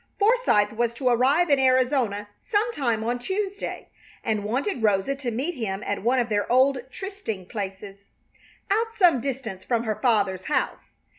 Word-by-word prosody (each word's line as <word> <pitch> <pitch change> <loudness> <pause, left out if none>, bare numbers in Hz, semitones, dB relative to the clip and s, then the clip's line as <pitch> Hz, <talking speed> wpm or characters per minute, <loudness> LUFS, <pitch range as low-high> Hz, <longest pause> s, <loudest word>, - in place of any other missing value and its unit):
Forsythe 410 - +3
was 235 +1 -1
to 255 +1 +1
arrive 275 +8 +3
in 280 - +5
Arizona 255 -5 +2
some 450 +1 0
time 235 - 0
on 240 +2 -1
Tuesday, 390 +7 -4 0.3
and 215 -2 -1
wanted 255 - -2
Rosa 210 +5 +2
to 265 -3 -3
meet 265 +10 -2
him 210 - -4
at 205 - -2
one 245 +5 +2
of 240 -2 +1
their 205 -1 -1
old 260 +2 +4
trysting 385 - -6
places, 195 -1 -6 0.7
out 445 +3 +2
some 345 - +5
distance 240 -8 -4
from 235 +1 0
her 215 -2 -2
father's 200 -7 +1
house. 300 - -1
245 Hz, 160 wpm, -25 LUFS, 210-285 Hz, 0.7 s, in